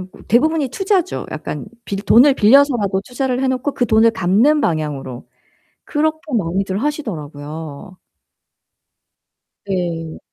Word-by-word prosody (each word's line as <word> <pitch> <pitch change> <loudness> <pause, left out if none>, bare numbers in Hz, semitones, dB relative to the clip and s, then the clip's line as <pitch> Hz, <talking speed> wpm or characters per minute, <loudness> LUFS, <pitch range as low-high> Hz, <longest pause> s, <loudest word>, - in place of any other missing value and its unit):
어 - - -5 0.3
대부분이 300 +4 +2
투자죠. 370 - -1
약간 150 -1 -6 0.2
빌 195 - -4
돈을 260 +6 +6
빌려서라도 230 -5 +4
투자를 255 0 -2
해 265 - +1
놓고 260 +2 -1
그 245 - +1
돈을 225 0 +4
갚는 225 +11 +3
방향으로. 150 - -3 0.6
그렇게 315 +1 0 0.2
많이들 190 +1 -1
하시더라고요. 160 - -6 1.7
네. 170 -4 -3
215 Hz, 265 characters per minute, -18 LUFS, 165-275 Hz, 1.7 s, 돈을